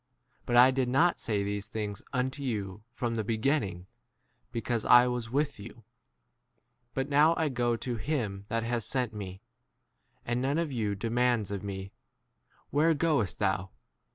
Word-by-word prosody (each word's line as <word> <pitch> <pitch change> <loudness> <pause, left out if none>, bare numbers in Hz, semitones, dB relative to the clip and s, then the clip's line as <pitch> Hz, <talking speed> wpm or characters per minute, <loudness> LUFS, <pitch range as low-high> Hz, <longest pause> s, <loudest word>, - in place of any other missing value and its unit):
But 120 - +1
I 125 +2 +8
did 130 -1 0
not 165 +7 +3
say 105 -3 -1
these 100 +1 -3
things 105 -2 -4
unto 130 +1 -1
you 105 -7 -3
from 120 -1 -2
[the] 110 -1 -1
beginning, 110 - 0 0.7
because 115 -1 -2
I 120 0 +7
was 125 -1 -2
5 115 - -12
with 145 -3 0
you. 115 +3 -11 1.1
But 135 0 -1
now 150 +3 +5
I 160 -2 +1
go 120 -2 +1
to 120 +1 -4
him 105 -5 -2
that 115 0 -1
has 115 0 -1
sent 125 0 -1
me, 95 -2 -7 0.8
and 120 +1 -1
none 140 +3 +1
of 165 -3 -1
you 110 -5 -1
demands 115 0 +1
11 - - -1
of 100 - -7
me, 95 0 -5 0.8
Where 155 +3 +3
goest 145 - +1
6 - - -35
thou 95 0 0
120 Hz, 170 wpm, -29 LUFS, 105-130 Hz, 1.1 s, I